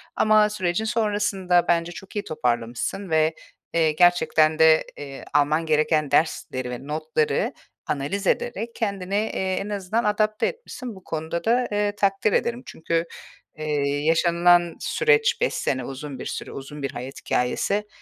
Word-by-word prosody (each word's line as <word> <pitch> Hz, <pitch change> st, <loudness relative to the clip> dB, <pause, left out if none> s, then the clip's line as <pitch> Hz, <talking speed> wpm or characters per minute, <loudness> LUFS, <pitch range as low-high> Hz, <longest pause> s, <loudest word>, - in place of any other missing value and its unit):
Ama 215 Hz, -1 st, +4 dB
sürecin 190 Hz, 0 st, -1 dB
sonrasında 205 Hz, -5 st, +1 dB
bence, 170 Hz, 0 st, +1 dB
çok 190 Hz, +3 st, -11 dB
iyi 205 Hz, -, -1 dB
toparlamışsın 120 Hz, -, -2 dB
ve, 160 Hz, 0 st, +2 dB, 0.4 s
eee, 160 Hz, -2 st, +3 dB
gerçekten 160 Hz, -2 st, +3 dB
de, 160 Hz, 0 st, +6 dB
eee, 140 Hz, -2 st, -8 dB
alman 150 Hz, +3 st, +2 dB
gereken 155 Hz, -1 st, +1 dB
dersleri 130 Hz, -5 st, 0 dB
ve 125 Hz, +3 st, -7 dB
notları 155 Hz, 0 st, 0 dB, 0.3 s
analiz 180 Hz, +8 st, -2 dB
ederek 230 Hz, +4 st, -1 dB
kendini, 200 Hz, -4 st, -2 dB
eee, 195 Hz, -3 st, -1 dB
en 200 Hz, +2 st, -4 dB
azından 205 Hz, +3 st, -1 dB
adapte 215 Hz, 0 st, +1 dB
etmişsin. 255 Hz, -, -7 dB
Bu 190 Hz, -, -14 dB
konuda 160 Hz, +1 st, -4 dB
da, 245 Hz, +2 st, +2 dB
eee, 205 Hz, 0 st, +1 dB
takdir 200 Hz, +1 st, +1 dB
ederim. 235 Hz, +1 st, 0 dB
Çünkü, 165 Hz, +1 st, -2 dB, 0.5 s
eee, 145 Hz, -2 st, -1 dB
yaşanılan 170 Hz, +1 st, +4 dB
süreç 465 Hz, -1 st, +2 dB
5 -, -, +1 dB
sene, 130 Hz, -2 st, -1 dB
uzun 135 Hz, 0 st, -7 dB
bir -, -, -6 dB
süre, -, -, -5 dB
uzun 140 Hz, +1 st, -8 dB
bir 135 Hz, -, -2 dB
hayat 125 Hz, +3 st, -7 dB
hikâyesi. 200 Hz, +12 st, 0 dB
175 Hz, 145 wpm, -24 LUFS, 155-210 Hz, 0.5 s, de